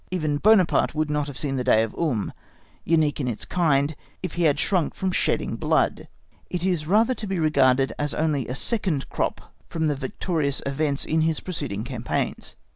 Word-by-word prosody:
Even 155 -5 -1
Buonaparte 190 -1 +4
would 155 -1 0
not 150 -1 0
have 140 - -7
seen 135 -2 -2
the 125 - -1
day 110 -3 +4
of 115 - -4
Ulm, 130 -11 -1 0.5
unique 155 -3 +2
in 135 - -1
its 115 -4 -3
kind, 150 -4 +1 0.3
if 185 - -3
he 175 -1 +1
had 145 -3 +3
shrunk 185 -6 +1
from 190 -1 -1
shedding - - 0
blood; - - +1 0.4
it 180 0 -2
is 175 -5 0
rather 220 +7 +4
to 220 -4 -6
be 195 -1 -2
regarded 135 -4 +3
as 145 0 -1
only 150 -4 0
a 125 - -4
second 180 - 0
crop - - -3 0.2
from 160 -1 -1
the 150 -2 +1
victorious 140 +2 -2
events 140 0 -1
in 160 +1 +1
his 160 -1 +1
preceding 110 - -4
campaigns. 120 -1 -3
150 Hz, 190 wpm, -24 LUFS, 135-175 Hz, 0.5 s, Buonaparte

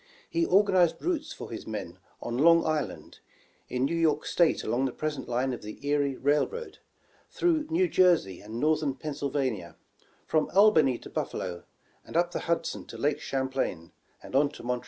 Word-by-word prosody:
He 335 0 0
organized 185 -3 +4
routes 315 -3 -1
for 320 - -8
his 115 - -7
men 105 -6 -6 0.2
on 120 - -3
Long 165 +2 +6
Island; 155 -2 -3 0.5
in 125 +1 0
New 165 +5 -1
York 165 -2 +1
State 170 -2 +2
along 130 +3 0
the 130 - -1
present 150 -1 -4
line 125 +2 0
of 120 - -6
the 105 0 -8
Erie 145 -2 +1
Railroad; 150 - -1 0.5
through 320 -3 +1
New 355 +3 +2
Jersey 175 - +3
and 110 +3 -7
Northern 155 -2 +1
Pennsylvania; 135 - -3 0.5
from 155 -1 +1
Albany 160 - +5
to - - -12
Buffalo; 90 -2 -4 0.4
and - - -4
up 175 0 +2
the - - -3
Hudson 170 0 -2
to - - -9
Lake 145 +1 0
Champlain, 130 - -2 0.3
and - - -8
on 145 +1 +4
to - - -11
Montreal. 125 0 -1
145 Hz, 170 wpm, -28 LUFS, 125-170 Hz, 0.5 s, Long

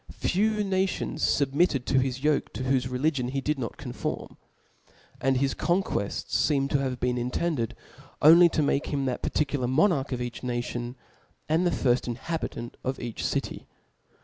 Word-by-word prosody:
(*"); - - -13
few 215 +3 +1
nations 190 -1 -1
fubmitted 140 -1 +2
to 130 - +3
his 130 0 -1
yoke^ 150 0 +1
to 130 - -4
whofe 130 -1 +1
religion 130 0 0
he 135 +2 -2
did 150 +1 -1
not 115 -4 -4
conform - - -5 0.4
} - - -29
and 135 0 +2
his 135 +1 +1
conquells 175 - -1
feem 140 -3 +1
to 140 - +1
have 130 -2 -2
been 125 0 0
intetidcd. 125 -1 -1 0.5
only 170 +3 +8
to 155 - +1
make 140 0 +1
him 140 -2 -1
the 125 -2 -1
particu: 145 -1 -1
lar 125 - 0
monarch 145 +1 +2
of 125 - -2
each 120 -1 -5
nation^ 120 0 -3 0.5
and 165 +3 +2
the - - +3
firft 125 -7 +1
inhabitant 120 -1 -4
of 130 +1 -2
each 120 -3 -5
city. - - -2
135 Hz, 175 wpm, -27 LUFS, 125-155 Hz, 0.5 s, only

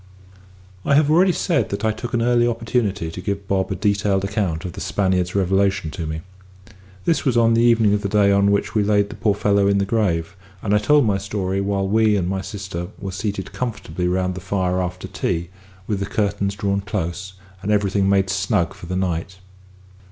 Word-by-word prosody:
I 140 - +3
have 150 0 +4
already 180 +4 +5
said 145 - 0
that 100 +2 -3
I 110 - +3
took 120 +2 -5
an 115 - +1
early 120 0 +3
opportunity 115 -7 -1
to 90 - -7
give 100 +1 -3
Bob 95 -1 0
a - - 0
detailed 100 0 +1
account 100 -5 -2
of 90 - -5
the - - -7
Spaniard's 95 -2 0
revelation 95 -3 +1
to 85 -3 -5
me. 80 +1 -4 0.8
This 165 - +1
was 130 -4 +1
on 115 -1 +4
the 115 - +3
evening 115 -3 +4
of 105 - +1
the 100 - -2
day 100 -1 +4
on 100 0 +4
which 100 0 0
we 110 - +2
laid 100 0 +2
the - - -8
poor 105 -1 +1
fellow 100 -1 +2
in 100 0 +3
his 100 - 0
grave; 95 -6 0 0.3
and 105 - 0
I 105 - +5
told 145 +6 +4
my 100 -3 +1
story 95 -1 -2
while 100 0 0
we 110 +1 +3
and 90 -3 0
my 95 +1 -1
sister 95 -4 -6
were 100 -1 -5
seated 95 0 -4
comfortably 90 -8 -3
round 90 +1 0
the 95 - -7
fire 90 -1 0
after 90 0 -4
tea, 85 +1 -2 0.4
with 100 -1 -2
the 100 - -2
curtains 100 -1 -1
drawn 100 0 -1
close, 95 -1 -4 0.3
and 105 - -2
everything 100 -1 +2
made 95 -1 +2
snug 95 -3 0
for 85 - -11
the 90 - -3
night. 90 0 -2
100 Hz, 210 wpm, -21 LUFS, 95-105 Hz, 0.8 s, already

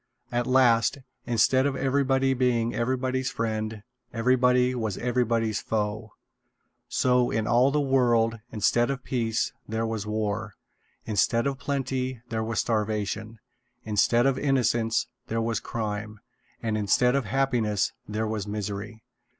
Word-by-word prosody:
At 120 0 -1
last, 125 -2 +4 0.3
instead 130 +3 +3
of 140 - -2
everybody 135 0 +2
being 120 -2 +1
everybody's 130 +1 -1
friend, 110 -1 -3 0.3
everybody 125 +1 +3
was 110 -6 -2
everybody's 115 -3 0
foe. 110 0 -3 0.8
So, 125 -1 +2
in 110 -1 -1
all 120 +4 +4
the 150 +2 +1
world, 120 -5 +2
instead 110 +3 +2
of 135 -2 -3
peace, 115 -3 -1 0.2
there 110 +1 -1
was 110 -2 -3
war; 105 -1 -2 0.5
instead 115 +2 +1
of 140 -1 -1
plenty, 130 -2 -2
there 110 -1 -2
was 110 0 -2
starvation; 110 0 -2 0.5
instead 110 +3 +2
of 135 -1 +2
innocence, 120 -5 +1 0.2
there 115 - -1
was 115 0 0
crime; 105 -1 -4 0.4
and 110 -1 0
instead 125 +5 +3
of 140 -4 0
happiness, 115 -4 0 0.2
there 110 +1 -1
was 105 -2 -3
misery. 105 +2 -5
115 Hz, 130 wpm, -26 LUFS, 110-125 Hz, 0.8 s, last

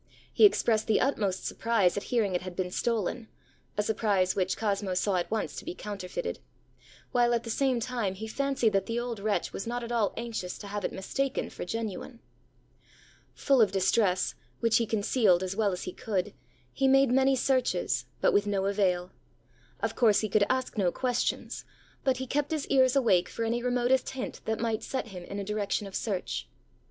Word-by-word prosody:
He - - +7
expressed 225 - +3
the 220 - +3
utmost 205 -8 0
surprise 225 -6 +1
at 200 - -1
hearing 220 -6 +1
it 180 - 0
had 185 -1 -7
been 180 -1 -2
stolen, 230 +2 -1 0.5
a 210 - +2
surprise 205 -4 +1
which 185 -1 0
Cosmo 200 -3 -1
saw 185 +1 +1
at 175 - -2
once 220 -1 -2
to - - -6
be 345 +2 -5
counterfeited; 205 - -5 0.7
while, 240 -1 +3
at 235 - -1
the 230 - -4
same 260 0 +1
time, 230 -5 -2
he 215 +3 -6
fancied 270 -2 0
that 195 - +1
the 230 +1 -1
old 240 -3 -4
wretch 210 0 -1
was 195 - -5
not 240 +1 -2
at 235 - -6
all 225 -4 +2
anxious 225 -6 -4
to - - -9
have 205 0 -4
it - - -1
mistaken 270 +8 -2
for - - -6
genuine. 225 +4 -5 1.2
Full 270 -3 +3
of 210 -4 +4
distress, 190 0 +2 0.3
which 230 -1 +3
he 230 - 0
concealed 205 -3 +3
as 185 +1 -3
well 210 -2 +2
as 180 - -4
he 180 - -5
could, 200 -7 -2 0.4
he 270 - +2
made 270 -1 +5
many 265 +1 +4
searches, 260 0 +1 0.2
but - - +4
with 205 0 +3
no 195 -1 0
avail. 185 -3 +1 0.7
Of 225 +1 -1
course 220 -5 +4
he 215 - -2
could 200 0 +3
ask 255 -3 -1
no 180 -3 +3
questions; 250 +2 -1 0.4
but 265 -2 +2
he 260 - -3
kept 290 +3 -1
his 310 -3 -2
ears 260 -1 +4
awake 190 -10 +3
for 230 - -3
any 235 +1 0
remotest 250 +1 +1
hint 265 -1 -5
that 220 -1 -1
might 225 -1 -1
set 260 -3 -4
him 180 -3 -8
in 200 - -6
a 200 - -2
direction 210 0 -1
of 195 - -9
search. 195 -4 -3
220 Hz, 195 wpm, -29 LUFS, 195-245 Hz, 1.2 s, He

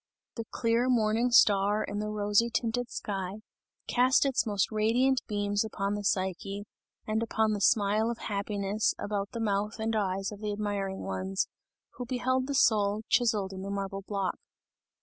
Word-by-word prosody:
The 230 - -5
clear 230 +2 +1
morning 230 0 +2
star 205 -2 +4
in 205 - -4
the 210 - -2
rosy 210 +2 +2
tinted 240 +1 -1
sky, 195 0 -4 0.4
cast 255 +3 +3
its 265 -3 +1
most 205 0 0
radiant 240 +5 +2
beams 205 0 0
upon 200 -2 -2
the 205 0 -3
Psyche, 195 +1 -1 0.4
and 220 +1 0
upon 220 -1 +1
the 205 - -3
smile 215 +2 +3
of 235 - -3
happiness 200 0 -1
about 200 -1 -3
the 230 - -5
mouth 210 -1 -1
and 220 0 -1
eyes 195 -1 -1
of 205 - -9
the 210 -1 -2
admiring 205 -2 -3
ones, 95 0 -2 0.5
who 245 -1 -5
beheld 255 +1 0
the 280 - -2
soul, 210 -3 +3
chiseled 210 -5 +2
in 190 - -6
the 195 - -5
marble 195 0 -3
block. 195 -2 -3
210 Hz, 165 wpm, -29 LUFS, 200-230 Hz, 0.5 s, star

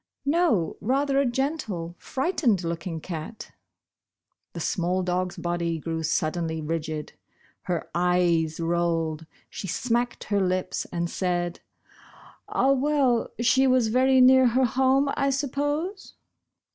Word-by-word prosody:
"No, 280 - +1
rather 275 +4 +1
a 280 - +2
gentle, 240 - -2
frightened 260 - 0
looking 170 0 -4
cat." 165 +5 -7 1.0
The - - -6
small 180 +1 0
dog's 180 0 -2
body 170 -1 -2
grew 160 +1 -4
suddenly 160 0 -1
rigid. 155 -1 -4 0.6
Her 175 -2 -1
eyes 175 -2 +1
rolled. 165 -2 -1 0.2
She 195 - -7
smacked 240 +6 -1
her 205 -1 0
lips 185 0 -1
and 170 0 -3
said: 175 -1 -2 0.9
"Ah, 270 - +2
well, 275 -3 +2
she 260 +3 +4
was 255 -3 +3
very 260 +2 +4
near 260 0 +7
her 255 +2 +3
home, 265 +3 +2
I 275 - +1
suppose 290 +8 -2
185 Hz, 120 wpm, -25 LUFS, 170-265 Hz, 1.0 s, near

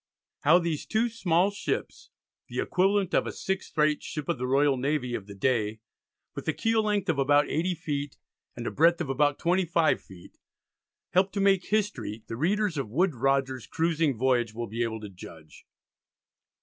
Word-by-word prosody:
How 160 +4 +5
these 170 -4 -2
two 225 +2 +1
small 195 -4 +1
ships 200 - -4 0.4
(the - - -5
equivalent 195 0 +1
of - - +2
a - - -2
6th 190 -3 -4
rate 150 0 +3
ship 150 -3 -6
of - - 0
the 125 - -2
Royal 140 +1 +3
Navy 130 -1 -1
of 105 -4 -4
the 100 - -9
day, 110 0 0 0.5
with - - -7
a - - +2
keel 225 0 +1
length 205 -2 0
of 160 -5 +1
about 145 +2 +4
80 175 +4 0
ft. 145 -4 -4 0.4
and - - -6
a - - -2
breadth 170 +3 +4
of 165 -6 -3
about 145 +1 +2
25 170 -2 +2
ft.) 90 -2 -15 0.7
helped 190 +2 +2
to - - 0
make 195 -2 +3
history, 120 - -2
the 115 - -6
readers 185 - 0
of 130 - -4
Woodes 170 - +1
Rogers's 135 0 0
"Cruising 160 -5 0
Voyage" 120 -3 +1
will 120 0 -3
be 115 +2 -5
able 110 -2 -2
to 105 - -7
judge. 80 -4 -13
150 Hz, 180 wpm, -27 LUFS, 125-180 Hz, 0.7 s, How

